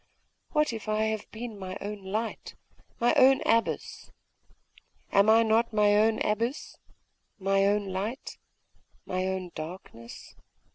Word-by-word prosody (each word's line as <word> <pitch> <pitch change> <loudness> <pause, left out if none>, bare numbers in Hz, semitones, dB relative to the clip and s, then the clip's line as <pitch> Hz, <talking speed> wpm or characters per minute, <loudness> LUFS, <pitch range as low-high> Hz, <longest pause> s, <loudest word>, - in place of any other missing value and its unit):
What 300 -4 +1
if 220 -1 -6
I 215 0 +1
have 220 -1 -2
been 225 -2 -8
my 185 -1 -6
own 205 0 -6
light, 215 +4 -4 0.4
my 240 +1 +3
own 265 +1 +5
abyss?.... 230 0 0 1.0
Am 200 +2 +4
I 225 +1 +6
not 225 +1 +2
my 210 -1 +4
own 220 +1 +3
abyss, 230 +7 -2 0.6
my 195 0 +2
own 205 0 +1
light 205 +8 -5 0.7
my 185 0 -2
own 190 -2 -4
darkness? 155 -8 -9
210 Hz, 130 wpm, -28 LUFS, 195-225 Hz, 1.0 s, I